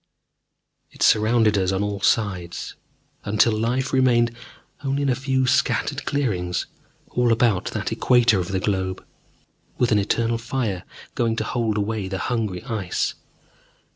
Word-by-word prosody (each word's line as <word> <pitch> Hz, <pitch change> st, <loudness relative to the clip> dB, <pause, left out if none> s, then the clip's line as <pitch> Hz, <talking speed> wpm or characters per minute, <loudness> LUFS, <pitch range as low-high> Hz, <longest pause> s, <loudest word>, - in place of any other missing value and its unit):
It -, -, -4 dB
surrounded 110 Hz, -1 st, +4 dB
us 95 Hz, -1 st, +1 dB
on 95 Hz, +1 st, 0 dB
all 105 Hz, -1 st, -2 dB
sides, 95 Hz, -7 st, 0 dB, 0.5 s
until 110 Hz, +3 st, +3 dB
life 120 Hz, +5 st, -1 dB
remained 120 Hz, -3 st, +3 dB, 0.5 s
only 140 Hz, +1 st, 0 dB
in 140 Hz, -, +1 dB
a 125 Hz, -, +2 dB
few 130 Hz, 0 st, 0 dB
scattered 140 Hz, +1 st, +1 dB
clearings 90 Hz, -11 st, -1 dB, 0.5 s
all 125 Hz, -1 st, +2 dB
about 115 Hz, -4 st, +2 dB
that -, -, -3 dB
equator 120 Hz, -5 st, +3 dB
of 90 Hz, -, -2 dB
the 95 Hz, 0 st, -1 dB
globe, 95 Hz, -1 st, -2 dB, 0.7 s
with 120 Hz, -2 st, +1 dB
an 105 Hz, -, +4 dB
eternal 115 Hz, +3 st, 0 dB
fire 115 Hz, -6 st, -3 dB, 0.3 s
going 115 Hz, -1 st, 0 dB
to -, -, -1 dB
hold 115 Hz, -3 st, -1 dB
away 105 Hz, -1 st, -2 dB
the 95 Hz, 0 st, -3 dB
hungry 110 Hz, -5 st, -2 dB
Ice. 110 Hz, -8 st, -2 dB
110 Hz, 140 wpm, -23 LUFS, 100-125 Hz, 0.7 s, surrounded